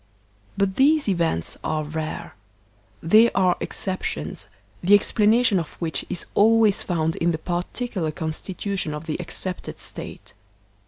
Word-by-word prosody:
But 195 -1 0
these 290 +1 +4
events 170 - 0
are 155 -1 -1
rare; 155 +1 -5 0.7
they 215 +8 +6
are 185 -2 +3
exceptions, 190 -1 -4 0.4
the 195 +4 +7
ex 205 - +1
planation 215 -1 +4
of 165 - -6
which 160 -5 -3
is 175 - -4
always 220 -1 +4
found 165 -2 -1
in 170 - +1
the 165 - 0
particular 175 +1 -2
consti 160 +3 -5
tution 195 -6 -2
of 150 +1 -6
the 160 0 -3
excepted 180 +1 -4
State. - - -7
180 Hz, 140 wpm, -24 LUFS, 160-205 Hz, 0.7 s, the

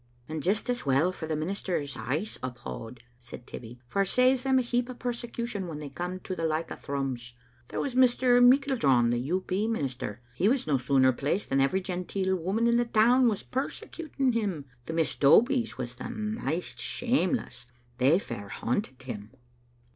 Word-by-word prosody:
"And 155 0 -4
just 200 - 0
as 245 -1 -1
well 140 +6 +3
for 160 -3 -6
the 155 - -1
ministers, 155 -3 -2
I'se 140 - -3
uphaud," 120 -1 -7 0.2
said 120 0 -11
Tibbie, 120 +1 -9
" - - -36
for 200 - 0
it 195 - +1
saves 255 +4 +4
them 265 0 +3
a 255 - +3
heap 245 +1 0
o' 255 - -6
persecution 235 -5 -4
when 160 -3 -5
they 150 -1 -6
come 180 +6 -4
to 185 - -4
the 165 - -4
like 160 0 -1
o' - - -3
Thrums. 130 -4 -4 0.3
There - - -4
was 275 - -2
Mr. 250 -1 +5
Meiklejohn, 245 - +4
the 120 +3 -1
IT. 185 +2 0
P. 200 +4 0
minister: 130 - -3
he 185 +11 +2
was 260 +1 +1
no 140 -4 +2
sooner 130 0 +4
placed 145 +11 -1
than 135 0 +3
every 140 +8 +2
genteel 190 +1 -1
woman 190 +6 0
in 235 0 +4
the 240 - +2
town 235 +3 +5
was 210 - -2
persecuting 275 +1 -2
him. 200 - -2 0.2
The 160 - -3
Miss 165 -1 +1
Dobies 235 - +4
was 120 -2 -4
the 125 - -7
maist 215 - -3
shameless; 235 - -1 0.3
they 135 +6 +5
fair 100 - -6
hunted 125 - -2
him." 110 -5 -6
180 Hz, 185 wpm, -28 LUFS, -, 0.3 s, Mr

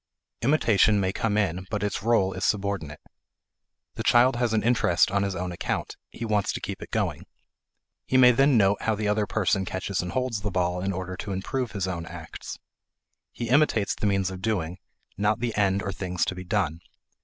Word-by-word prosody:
Imitation 110 -6 +3
may 95 -1 0
come 105 -1 0
in 95 -3 -1
but 105 -1 -2
its 105 - -2
role 100 -4 +2
is - - -5
subordinate. 100 -8 -1 0.9
The 115 - -5
child 120 +2 +5
has 120 -2 +1
an 110 -1 +1
interest 105 -8 +3
on 100 +1 +1
his 100 -1 -1
own 90 0 -3
account; 85 - -3
he 115 - -6
wants 105 -2 +1
to - - -3
keep - - -6
it - - -8
going. - - -2 0.8
He 130 - +2
may 125 -1 +8
then 135 +1 +4
note 100 -1 +3
how 110 - +1
the 105 0 -2
other 105 0 +1
person 95 -2 +1
catches 95 +1 -2
and 90 0 -5
holds 125 -5 -1
the 105 - -2
ball 90 -1 0
in 95 +1 -1
order 95 0 -4
to 100 - -4
improve 120 +6 -3
his 95 -3 -2
own 85 -2 -4
acts. - - -8 0.7
He 120 -1 -5
imitates 130 -6 +3
the 105 - -2
means 95 -1 +1
of 95 0 -7
doing, 95 -5 -2 0.4
not 105 +3 +1
the 120 -1 -2
end 100 -1 +1
or 100 - -2
thing 90 -1 -5
to 90 - +1
be 90 0 -7
done. 90 -5 -1
100 Hz, 200 wpm, -26 LUFS, 95-110 Hz, 0.9 s, may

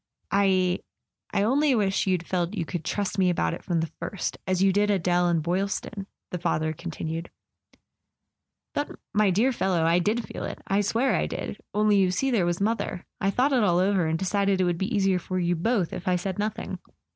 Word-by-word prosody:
"I—I 190 0 0
only 275 +5 +3
wish 195 -3 +1
you'd 180 -2 +1
felt 180 +2 -1
you 170 -5 -2
could 170 0 -4
trust 200 +3 -2
me 185 -1 +4
about 85 - 0
it - - -7
from 170 -2 0
the 160 - -3
first, 200 - -4
as 185 0 +2
you 195 -1 +4
did 205 +1 +2
Adele 180 -2 +2
and 165 -2 +1
Boylston," 195 +3 -2 0.2
the 180 - -3
father 155 -2 0
continued. 165 0 -5 0.7
" - - -58
But, 290 - -1 0.2
my 210 -1 +4
dear 220 +9 +3
fellow, 190 -8 +1
I 165 +2 +4
did 210 +4 0
feel - - -6
it! - - -6
I 195 +1 +2
swear 230 +6 +1
I - - 0
did! - - -5
Only, 210 -1 +4
you 190 -2 +4
see, 265 +9 0
there 195 -8 +2
was 175 0 -1
mother. 200 -3 -1
I 195 - +1
thought 255 +8 +2
it 250 - +4
all 175 -5 +3
over, 185 -2 +2
and 160 +1 0
decided 195 +1 +1
it - - +3
would 175 -1 0
be 195 +5 -2
easier 195 -4 +2
for 185 +1 -4
you 175 -1 +1
both 190 +1 0
if 175 - -6
I 180 - +3
said 185 +2 -3
nothing. 210 +1 -3
190 Hz, 210 wpm, -26 LUFS, 175-205 Hz, 0.7 s, me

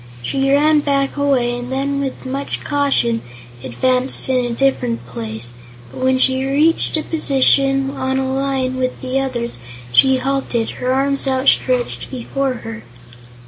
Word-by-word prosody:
She 270 - 0
ran 300 +2 +4
back 275 -1 0
a 285 - -2
way 245 -4 +1
and 245 +1 -7
then 280 +1 -1
with 270 -1 -5
much 275 +2 -4
caution 275 -5 +1 0.4
advanced 255 - +1
in 255 -1 +2
a - - -2
different 245 -2 0
place, 115 0 -7 0.4
but - - -10
when 260 0 +2
she 260 0 +2
reached 300 +5 +2
a 310 - -2
position 275 -2 +2
on 265 -1 -2
a 265 0 -1
line 265 -1 -1
with 255 0 -2
the 260 +1 -1
others 240 - -3 0.3
she 265 - +5
halted, 255 -3 -1
her 250 - 0
arms 275 +1 0
outstretched 260 -1 +1
before 265 +1 -2
her. 110 -1 -7
265 Hz, 150 wpm, -18 LUFS, 250-275 Hz, 0.4 s, she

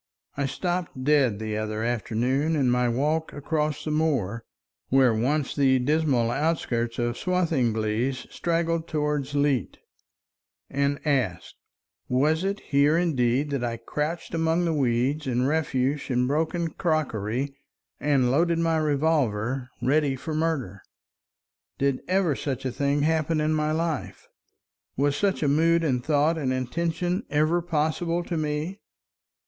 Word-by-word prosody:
I 140 -1 -1
stopped 175 -2 -3
dead 135 -7 +3
the 110 0 -4
other 110 0 -3
afternoon 120 +6 0
in 135 -4 +2
my 125 0 +2
walk 150 +6 0
across 150 +1 -2
the 155 - -1
moor, 130 -9 0 0.5
where 130 -3 +4
once 135 +6 0
the 135 -2 +3
dismal 130 -3 +1
outskirts 120 -6 -1
of 120 0 -1
Swathinglea 125 -10 +1 0.2
straggled 165 -1 -1
toward 150 -3 -1
Leet, 140 -4 +1 0.9
and 140 +1 0
asked, 125 - 0 0.6
"Was 150 +6 +2
it 195 +1 -2
here 145 +3 +3
indeed 145 -4 +1
that 140 -3 -1
I 115 -1 -2
crouched 150 +9 -4
among 165 +1 +1
the 165 - +1
weeds 135 +2 0
and 125 0 +1
refuse 145 -2 0
and 125 -1 +1
broken 160 +3 0
crockery 135 - -1 0.5
and 135 -4 +2
loaded 165 +4 +2
my 165 -1 +1
revolver 135 -5 0
ready 140 0 +2
for 155 +4 -5
murder? 150 - -1 1.0
Did 140 -1 0
ever 180 -5 +2
such 135 -2 -4
a 130 - 0
thing 140 +2 0
happen 160 0 +1
in 155 +1 +1
my 155 0 0
life? 160 -2 -3 0.7
Was 140 +1 +2
such 195 0 0
a - - +2
mood 165 +4 +3
and 125 -6 0
thought 155 +3 +2
and 135 -4 -1
intention 170 - -1
ever 155 +4 +2
possible 165 +1 -1
to 170 - -4
me? 155 +5 -2
145 Hz, 135 wpm, -26 LUFS, 125-160 Hz, 1.0 s, where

